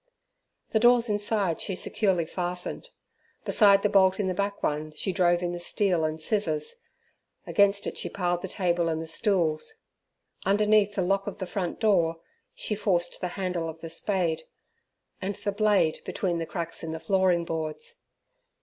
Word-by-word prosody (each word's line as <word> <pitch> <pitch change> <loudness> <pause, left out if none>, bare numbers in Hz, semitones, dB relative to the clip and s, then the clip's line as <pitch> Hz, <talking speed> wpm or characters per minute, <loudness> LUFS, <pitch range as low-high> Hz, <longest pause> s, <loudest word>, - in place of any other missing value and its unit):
The 220 - +3
doors 240 0 +5
inside 205 -4 0
she 190 - -2
securely 185 -3 0
fastened. 180 - -4 0.6
Beside 200 -2 +6
the - - +5
bolt 190 -1 +4
in 200 - 0
the 185 - 0
back 200 +2 -2
one 150 +1 -1
she 170 +5 -2
drove 175 -1 +2
in 175 - -1
the 175 - -4
steel 175 -1 +1
and 155 0 -2
scissors; 160 - -1 0.7
against 200 0 +3
it - - -4
she - - -3
piled 175 -2 -1
the 190 - -4
table 175 -2 0
and 160 -1 -1
the 165 - -4
stools. 165 -3 0 0.7
Underneath 205 +1 +3
the 190 - +1
lock 195 +2 0
of 205 - -4
the 190 - -4
front 180 -2 -3
door 170 -7 +2 0.4
she - - -3
forced 185 -4 0
the 180 - -1
handle 180 -4 -2
of 160 0 -9
the 165 - -6
spade, 170 -1 -1 0.8
and 195 +1 -2
the 205 - -3
blade 200 -6 +2
between 175 -3 -2
the 165 - -3
cracks 165 +1 -5
in 160 0 -4
the 160 - -5
flooring 185 -2 +2
boards. 165 - -4
185 Hz, 170 wpm, -27 LUFS, 165-200 Hz, 0.8 s, Beside